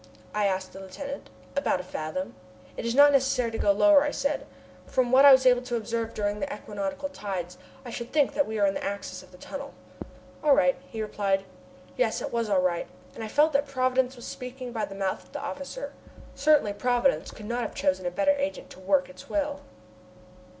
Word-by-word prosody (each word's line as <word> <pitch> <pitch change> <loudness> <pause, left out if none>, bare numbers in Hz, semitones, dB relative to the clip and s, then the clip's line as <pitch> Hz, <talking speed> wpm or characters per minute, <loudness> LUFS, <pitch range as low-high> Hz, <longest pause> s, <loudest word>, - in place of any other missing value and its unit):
I 210 -1 +2
asked 185 -1 -2
the 195 - -9
lieutenant. 235 +10 -7 0.3
"About 280 -9 +1
a - - -5
fathom." 180 +1 -4 0.4
"It - - -4
is 235 - -1
not 290 +1 +8
necessary 265 -3 +2
to 225 - -3
go - - +2
any 200 - +4
lower," 305 +1 +7
I 295 - +1
said. 285 0 -2 0.4
"From 250 -2 +1
what 265 +2 +7
I 280 - +11
was 260 0 +6
able 245 -1 +6
to 250 -1 -3
observe 230 0 -3
during 205 0 -1
the 285 +3 -3
equinoctial 210 +4 -4
tides, 185 -8 -5 0.3
I 240 - -6
should 235 +1 -6
think 290 -3 +3
that 290 - +1
we 220 0 -3
are 205 - +4
in 195 - +2
the - - -4
axis 195 -2 -4
of 185 - -17
the 180 - -14
tunnel." 280 +8 -8 0.7
"All 295 -2 +6
right," 180 0 +4
he 220 -1 -4
replied. 195 -2 0 0.5
Yes, - - +1
it - - -5
was 230 -2 0
all 190 -2 +3
right, 175 -2 0 0.3
and 225 - -7
I - - -4
felt 300 +7 +3
that 280 +1 +2
Providence 255 -1 +1
was 240 - -10
speaking 250 0 -7
by 220 -3 -2
the 195 0 -10
mouth 195 -1 -2
of - - -23
the 290 - -4
officer. 285 - -6 0.4
Certainly 280 -7 +3
Providence 245 +4 +1
could 215 - -10
not 240 +3 -2
have 225 - -4
chosen 185 -1 0
a - - +2
better 200 +9 +2
agent 285 +1 -3
to - - -12
work 185 -1 +2
its 185 0 -13
will. 290 -1 -1
235 Hz, 220 wpm, -27 LUFS, 195-280 Hz, 0.7 s, I